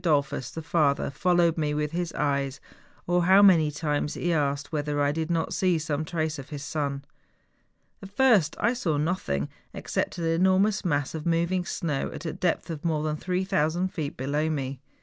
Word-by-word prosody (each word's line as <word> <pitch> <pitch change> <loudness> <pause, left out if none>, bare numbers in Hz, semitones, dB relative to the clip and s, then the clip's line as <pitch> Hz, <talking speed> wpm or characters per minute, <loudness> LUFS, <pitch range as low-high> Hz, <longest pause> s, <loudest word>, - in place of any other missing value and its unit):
Dollfus, 140 -6 +1
the 160 - -6
father, 150 -4 +1
followed 175 0 +2
me 150 -1 0
with 150 0 -1
his 175 0 -2
eyes, 140 -2 -1 0.5
or 175 0 +2
how 190 +2 +7
many 165 -6 +6
times 150 0 -2
he 175 0 0
asked 145 -2 -1
whether 150 -1 -1
I 145 0 +2
did 160 +2 -3
not 165 -1 0
see 180 -3 +2
some 155 -1 -2
trace 155 -2 -2
of 135 - -9
his 145 -2 -6
son. 140 -2 -3 1.0
At 195 - -9
first 205 - +3
I 235 - +2
saw 170 -12 -1
nothing 145 - -1 0.3
except - - -2
an 170 - -3 0.2
enor¬ 190 0 +4
mous 210 +1 +1
mass 145 -6 0
of 160 0 -4
moving 170 +2 +1
snow 150 -5 -2
at - - -8
a 160 - -2
depth 175 -1 -1
of 155 -2 -6
more 155 -3 0
than 155 -1 -1
3000 180 0 0
feet 155 -5 -5
below 145 +4 -1
me. 135 -3 -3
160 Hz, 190 wpm, -26 LUFS, 145-175 Hz, 1.0 s, how